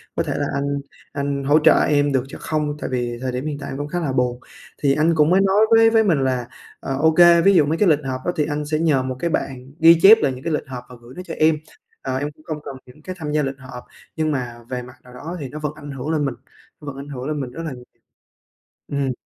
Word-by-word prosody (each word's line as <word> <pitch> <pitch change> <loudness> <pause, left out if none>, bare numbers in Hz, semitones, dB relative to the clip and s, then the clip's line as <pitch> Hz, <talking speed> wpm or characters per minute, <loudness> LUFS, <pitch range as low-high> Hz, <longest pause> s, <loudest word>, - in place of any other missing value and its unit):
có - - 0
thể - - -3
là 145 - -1
anh 140 0 -1 0.3
anh 140 -1 -2
hỗ 145 +3 +4
trợ 160 +1 +5
em 145 -1 +2
được 130 -2 +1
cho - - -9
không? 150 -1 -2
Tại - - -4
vì 120 -2 -2
thời 130 -1 -2
điểm 125 +3 -4
hiện 150 -2 -3
tại 140 - -7
em 135 - -5
cũng 145 +1 -4
khá 175 +3 -3
là 145 -5 -2
buồn." 125 -1 0 0.4
Thì 140 -1 +4
anh 165 +2 +2
cũng 150 -1 +4
mới 185 +2 +4
nói 195 +2 +3
với 225 0 +7
với 225 0 +4
mình 170 -9 +2
là, 125 -2 -1 0.3
ờ, 135 - -4
ô 160 +3 +4
kê 170 +1 +6
ví 195 +3 +5
dụ 155 - +5
mấy 155 +3 -1
cái 205 -1 +3
lịch 150 -2 +4
họp 130 -1 -3
đó 175 - +1
thì 150 -3 +1
anh 150 0 -3
sẽ 155 +1 -1
nhờ 150 -5 +2
một 130 0 -4
cái 170 - -1
bạn 130 -4 -4
ghi 165 +1 +7
chép 220 +3 +9
lại 135 - +2
những 130 +1 -10
cái 165 - -2
lịch 150 - -2
họp 125 -2 -7
và 125 - -11
gửi 120 +2 -14
nó 180 - -6
cho - - -6
em, 155 0 +3 0.5
ờ, 130 -1 -3
em 145 +2 -2 0.2
không 155 - -4
cần 135 - -6
những 125 +4 -17
cái 185 +4 -7
tham 150 -2 -4
gia 150 -1 +1
lịch 135 0 -3
họp, 125 -2 -10 0.3
nhưng 155 -1 0
mà 125 -4 -4
về 125 -1 -3
mặt 125 +1 -12
nào 125 - -15
đó 165 +8 -7
thì 135 -4 -6
nó 150 - -7
vẫn 150 -1 -3
ảnh 145 -1 -9
hưởng 135 +2 -5
lên 155 -2 0
mình, 135 -3 -2 0.5
nó - - -12
vẫn 140 - -5
ảnh 140 +1 -8
hưởng 130 -1 -6
lên 150 -1 -2
mình 125 -2 -6
rất 165 +6 -7
là 160 - -4
nhiều. 125 0 -12 1.0
Ừm. 140 -2 -1
145 Hz, 290 wpm, -21 LUFS, 130-160 Hz, 1.0 s, chép